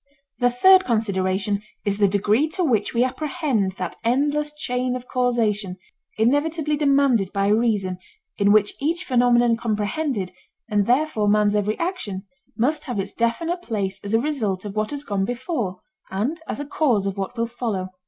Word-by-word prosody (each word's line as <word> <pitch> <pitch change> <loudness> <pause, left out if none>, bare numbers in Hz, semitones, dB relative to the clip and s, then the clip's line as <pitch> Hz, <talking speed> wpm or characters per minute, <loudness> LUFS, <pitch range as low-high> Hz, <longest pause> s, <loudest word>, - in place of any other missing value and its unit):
The 245 -1 +4
third 375 +10 +6
consideration 200 - 0 0.2
is 200 0 0
the 200 - +5
degree 205 +8 +2
to 365 - +1
which 245 -10 +1
we 235 +1 +2
apprehend 260 - -1
that 180 -2 -5
endless 290 +5 +1
chain 250 -4 -2
of 250 0 -7
causation 220 -7 0 0.4
inevitably 300 +6 +1
demanded 275 -8 +2
by 200 0 +1
reason, 205 -5 +1 0.4
in 200 0 +3
which 210 -1 +4
each 335 +5 0
phenomenon 240 -3 +3
comprehended, 215 - -2 0.4
and 205 -3 +1
therefore 250 -4 +2
man's 210 0 +3
every 210 +1 0
action, 335 - -3 0.3
must 275 +7 0
have 245 -7 -3
its 195 - -3
definite 330 +10 -1
place 200 - -3
as 200 +2 0
a - - +4
result 225 -9 -2
of 205 0 -6
what 215 0 0
has 285 -1 -4
gone 200 -6 -1
before 240 - -3 0.3
and 245 +13 -2
as - - -4
a 290 - -3
cause 255 -9 +1
of 195 -1 -2
what 200 +5 -5
will 230 - +1
follow. 225 -6 -3
230 Hz, 165 wpm, -23 LUFS, 200-280 Hz, 0.4 s, third